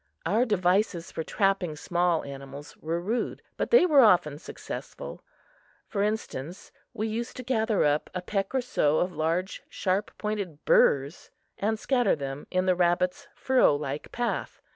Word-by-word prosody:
Our 215 Hz, +8 st, +2 dB
devices 185 Hz, -4 st, +1 dB
for -, -, -4 dB
trapping 195 Hz, -3 st, 0 dB
small 175 Hz, +1 st, 0 dB
animals 140 Hz, +1 st, -9 dB
were 165 Hz, +2 st, -2 dB
rude, 215 Hz, +8 st, -2 dB
but -, -, -2 dB
they 475 Hz, -6 st, +7 dB
were 300 Hz, -6 st, +6 dB
often 175 Hz, -, +4 dB
successful. -, -, -8 dB, 0.6 s
For 200 Hz, -, -2 dB
instance, 200 Hz, -6 st, -3 dB, 0.2 s
we 220 Hz, -, -3 dB
used 230 Hz, +2 st, -4 dB
to 255 Hz, -, -6 dB
gather 225 Hz, -4 st, +1 dB
up 150 Hz, +1 st, +1 dB
a 180 Hz, -, -3 dB
peck 195 Hz, +5 st, -2 dB
or 260 Hz, -, +3 dB
so 155 Hz, -11 st, +1 dB
of 180 Hz, -, +1 dB
large, 170 Hz, +4 st, -1 dB
sharp 190 Hz, +2 st, -1 dB
pointed 200 Hz, -8 st, -4 dB
burrs 140 Hz, +4 st, +3 dB, 0.3 s
and 220 Hz, +2 st, 0 dB
scatter 250 Hz, +2 st, +2 dB
them 140 Hz, -1 st, -6 dB
in 185 Hz, 0 st, 0 dB
the 185 Hz, -, +4 dB
rabbit's 180 Hz, 0 st, +1 dB
furrow 260 Hz, -, +3 dB
like 145 Hz, 0 st, -5 dB
path. 240 Hz, -1 st, -3 dB
185 Hz, 155 wpm, -27 LUFS, 155-220 Hz, 0.6 s, they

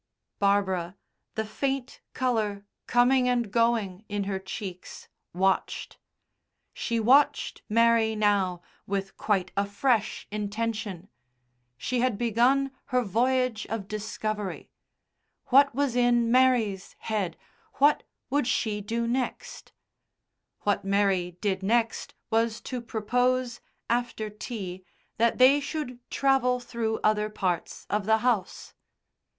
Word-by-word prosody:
Barbara, 190 Hz, -3 st, +1 dB, 0.4 s
the 220 Hz, -, -1 dB
faint 270 Hz, +4 st, -3 dB
colour 215 Hz, -5 st, -1 dB, 0.2 s
coming 250 Hz, +1 st, +4 dB
and 240 Hz, -4 st, 0 dB
going 225 Hz, -4 st, +1 dB
in 205 Hz, -1 st, -1 dB
her 195 Hz, -1 st, -2 dB
cheeks, 190 Hz, -1 st, -8 dB, 0.2 s
watched. 190 Hz, +2 st, -1 dB, 0.7 s
She 230 Hz, -1 st, -1 dB
watched 260 Hz, +6 st, +3 dB
Mary 230 Hz, 0 st, +3 dB
now 195 Hz, -4 st, +1 dB, 0.2 s
with 195 Hz, 0 st, -3 dB
quite 190 Hz, -3 st, 0 dB
a 200 Hz, -, +2 dB
fresh 220 Hz, +1 st, 0 dB
intention. 210 Hz, -3 st, -3 dB, 0.7 s
She 245 Hz, -, -2 dB
had 245 Hz, -4 st, +1 dB
begun 245 Hz, +4 st, +2 dB
her 250 Hz, 0 st, +1 dB
voyage 245 Hz, +2 st, +1 dB
of 215 Hz, -3 st, -4 dB
discovery: 215 Hz, -1 st, -4 dB, 0.8 s
what 275 Hz, 0 st, +5 dB
was 275 Hz, -3 st, 0 dB
in 240 Hz, -1 st, +3 dB
Mary's 240 Hz, -7 st, +2 dB
head, 205 Hz, -6 st, -2 dB, 0.4 s
what 290 Hz, +2 st, +4 dB, 0.3 s
would 285 Hz, -3 st, +1 dB
she 210 Hz, -4 st, 0 dB
do 230 Hz, +3 st, -2 dB
next? 250 Hz, +2 st, -3 dB, 0.9 s
What 205 Hz, -, 0 dB
Mary 195 Hz, -3 st, +1 dB
did 195 Hz, -2 st, 0 dB
next 225 Hz, +3 st, 0 dB, 0.2 s
was 225 Hz, 0 st, +1 dB
to 250 Hz, -2 st, -5 dB
propose, 245 Hz, +2 st, 0 dB, 0.3 s
after 235 Hz, -3 st, -1 dB
tea, 195 Hz, -4 st, -6 dB, 0.3 s
that 235 Hz, +1 st, +2 dB
they 265 Hz, +3 st, +6 dB
should 285 Hz, -4 st, -5 dB
travel 265 Hz, -2 st, +2 dB
through 230 Hz, -2 st, -3 dB
other 215 Hz, 0 st, +2 dB
parts 185 Hz, -5 st, -3 dB
of 210 Hz, -1 st, -1 dB
the 220 Hz, 0 st, +5 dB
house. 220 Hz, -7 st, -1 dB
220 Hz, 115 wpm, -27 LUFS, 200-245 Hz, 0.9 s, they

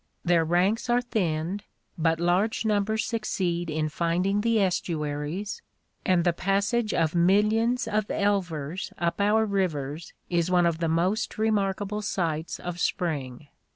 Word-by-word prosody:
Their 170 Hz, -1 st, +4 dB
ranks 185 Hz, +9 st, +1 dB
are 240 Hz, 0 st, +4 dB
thinned, 180 Hz, -4 st, -1 dB, 0.3 s
but 165 Hz, 0 st, +1 dB
large 185 Hz, +7 st, +1 dB
numbers 215 Hz, +1 st, +1 dB
succeed 185 Hz, -7 st, -2 dB
in 155 Hz, 0 st, -1 dB
finding 175 Hz, +6 st, 0 dB
the 230 Hz, 0 st, +2 dB
estuaries, 170 Hz, -, -2 dB, 0.4 s
and 180 Hz, -2 st, +3 dB
the 175 Hz, -1 st, +2 dB
passage 200 Hz, +5 st, 0 dB
of 160 Hz, -2 st, +1 dB
millions 210 Hz, +7 st, +3 dB
of 210 Hz, 0 st, 0 dB
elvers 180 Hz, -6 st, -1 dB
up 170 Hz, +3 st, -1 dB
our 215 Hz, +2 st, +3 dB
rivers 170 Hz, -7 st, -2 dB
is 175 Hz, 0 st, 0 dB
one 180 Hz, -1 st, +4 dB
of 170 Hz, -1 st, +1 dB
the 165 Hz, -1 st, 0 dB
most 185 Hz, +9 st, 0 dB
remarkable 210 Hz, -1 st, 0 dB
sights 165 Hz, -6 st, -2 dB
of 175 Hz, 0 st, -5 dB
Spring. 145 Hz, -7 st, -2 dB
180 Hz, 135 wpm, -26 LUFS, 165-210 Hz, 0.4 s, Their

